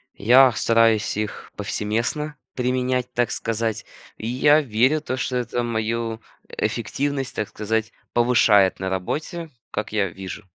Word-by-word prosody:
Я 125 +4 +6
стараюсь 115 -1 +2
их 105 -1 -4
повсеместно 120 +8 -2 0.2
применять, 125 0 -1
так 120 -1 +1
сказать, 115 -1 -2 0.3
и 110 - -5
я 145 +5 +4
верю, 130 +5 +2
то 130 -3 -3
что 130 -1 -1
это 120 0 -2
мою 115 0 -2 0.3
эффективность, 135 +4 -2
так 105 - -2
сказать, 110 +1 -2 0.2
повышает 115 -5 +4
на 95 0 -2
работе, 155 - -3 0.2
как 110 0 -4
я 100 -3 +1
вижу. 95 +3 -8
115 Hz, 130 wpm, -23 LUFS, 110-130 Hz, 0.3 s, Я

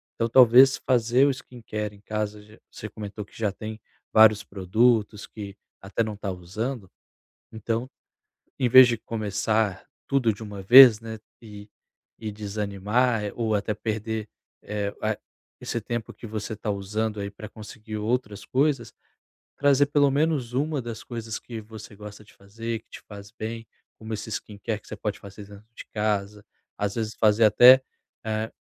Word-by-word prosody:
então 115 - 0
talvez 130 +2 +7
fazer 125 +1 +3
o - - +3
skincare 110 -5 -6
em 100 - -20
casa, 105 0 -4
ge 105 +1 -18
você 105 - -8
comentou 105 0 -7
que - - -19
já 105 -3 0
tem 110 +2 -8 0.3
vários 110 -1 +6
produtos, 105 +2 +1
que 100 -2 -9 0.3
até 100 +4 -1
não 110 -1 -5
tá 100 -2 -4
usando, 95 +5 -5 0.6
então, 115 +3 -3 0.7
em 125 - +2
vez 130 0 +9
de 120 -1 0
começar 110 -2 -1 0.2
tudo 135 -5 +2
de 100 - -15
uma 105 -2 -8
vez, 120 +2 +9
né, 110 -1 -8 0.2
e 105 -2 -12 0.5
e 110 -1 -5
desanimar 105 +2 -1
ou 115 -2 -1
até 105 +1 -1
perder, 110 0 -4 0.3
eh, 100 -1 -4
ah 110 -1 -1 0.4
esse 115 - -4
tempo 120 0 -5
que - - -12
você 110 0 -5
tá 105 - -5
usando 105 +2 -3
aí 100 0 -4
pra 105 +1 -10
conseguir 110 0 -9
outras 105 -2 -2
coisas, 135 -4 0 0.6
trazer 145 0 +4
pelo 145 -1 +3
menos 140 -4 0
uma 145 +1 -1
das 115 -2 -7
coisas 115 -2 -6
que 115 -2 -8
você 110 -1 -11
gosta 105 0 -10
de 105 - -21
fazer, 115 +3 -6
que - - -46
te - - -11
faz 100 -1 -11
bem, 115 0 -6 0.3
como 110 0 -7
esse 105 +1 -5
skincare 105 0 -5
que - - -23
você - - -7
pode 105 -1 -4
fazer 100 +1 -11
dentro 100 +1 -14
de - - -10
casa, 105 -1 -2 0.3
às 100 -1 -2
vezes 110 -1 -3
fazer 110 0 +3
até, 125 +5 +8 0.4
eh, 110 0 -2
110 Hz, 165 wpm, -25 LUFS, 105-115 Hz, 0.7 s, vez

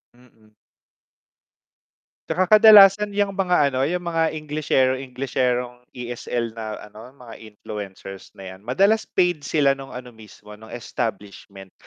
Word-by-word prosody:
Mm. 120 -3 -24 1.8
'Tsaka 185 +4 +3
kadalasan 205 -1 +7
'yang 205 -1 0
mga 180 -7 +1
ano, 130 +2 0
'yung 175 +1 -3
mga 165 -2 -1
englishero 145 -4 0
englisherong 125 -2 -3 0.2
ESL 120 -1 -4
na 110 -1 -7 0.2
ano 120 +6 -14
mga 120 -4 -13
influencers 105 -3 -10
na 95 -2 -10
'yan, 95 +4 -16
madalas 200 - +2
paid 175 -6 0
sila 145 -3 +2
nung 135 -1 -7
ano 125 -1 -9
mismo 105 -2 -16
nung 110 - -14
establishment. 100 -4 -7
125 Hz, 125 wpm, -22 LUFS, 110-165 Hz, 1.8 s, kadalasan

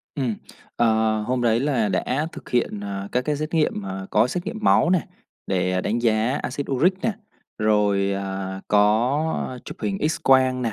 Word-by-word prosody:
Ừm. 125 -6 -1 0.4
Ờ, 110 -2 +2
hôm 125 0 0
đấy 115 0 +3
là 130 -6 +1
đã 135 +9 -1
thực - - -11
hiện, 120 -4 0
à, 100 -1 -5
các 125 0 0
cái 150 -1 0
xét 155 +3 -4
nghiệm, 150 -10 +1
à, 95 0 -5
có 105 +3 +4
xét 175 +8 -4
nghiệm 220 +1 -4
máu 170 - +4
nè, 185 - +4 0.5
để 90 -1 0
đánh 110 +5 -1
giá 115 +3 +2
acid 140 -1 -4
uric 160 +8 +3
nè, 225 - +1 0.5
rồi, 105 -2 +2
à, 95 -1 -4
có 125 +7 +1
chụp - - -8
hình 195 -1 -1
X-quang 130 -4 +2
nè, 115 -3 -1
115 Hz, 180 wpm, -23 LUFS, 105-140 Hz, 0.5 s, có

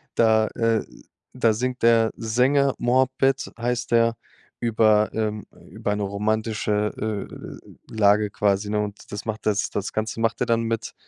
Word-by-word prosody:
Da 110 -1 +4
äh, 115 -2 +1 0.5
da 115 -3 +2
singt 125 +3 -3
der 115 -1 +4
Sänger, 130 +5 +2
Muhabbet 130 +2 +1
heißt 120 +1 -2
der 115 -1 +3 0.4
über 110 -2 +3
ähm, 110 -2 -2 0.2
über 105 - -3
'ne 105 - -2
romantische, 105 0 -1 0.6
äh, - - -9
Lage 105 0 +3
quasi, 100 0 0
ne? 105 0 0
Und 105 -1 -7
das 105 0 -6
macht 110 -1 -5
das 105 -1 +1
das 100 0 -4
Ganze 110 +1 -3
macht 115 0 0
er 125 - +1
dann 115 -1 +2
mit 115 -1 -3
110 Hz, 150 wpm, -23 LUFS, 105-115 Hz, 0.6 s, Da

